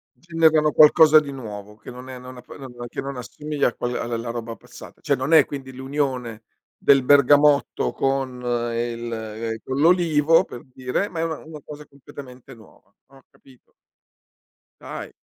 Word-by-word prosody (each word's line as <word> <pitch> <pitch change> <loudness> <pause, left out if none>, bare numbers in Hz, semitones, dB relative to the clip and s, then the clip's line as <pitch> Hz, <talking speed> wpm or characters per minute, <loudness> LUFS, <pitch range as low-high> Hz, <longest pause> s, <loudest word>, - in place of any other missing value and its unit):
Generano 160 -3 +2
qualcosa 155 0 +7
di 140 -2 -7
nuovo 105 -5 -9
che - - -12
non 125 +1 -11
è 130 - -8
non 125 0 -11
app 125 - -14
che - - -10
non 120 -3 -9
che - - -5
non 135 -1 -6
assomiglia 150 +5 -2
a - - -4
quella 120 0 -3
a - - -4
alla 115 0 -4
roba 115 -1 -5
passata. - - -15
Cioè, 140 - 0
non 130 +5 -3
è 155 -3 +7
quindi 135 -2 -8
l'unione 130 -4 -4 0.3
del 135 -2 +4
bergamotto 145 +2 +3
con 135 -2 -2 0.3
il 120 0 -4
ehm, 110 +1 -5
con 130 +1 -4
l'olivo, 165 -2 +4
per 120 - -11
dire, 130 +11 -2
ma 165 - -6
è 165 - 0
una 160 -2 -4
una 155 -1 -11
cosa 150 -1 -11
completamente 135 -1 -13
nuova, 110 -3 -21
ho 135 -1 -20
capito. 130 -2 -23 1.1
Dai. - - -8
135 Hz, 175 wpm, -22 LUFS, 120-150 Hz, 1.1 s, qualcosa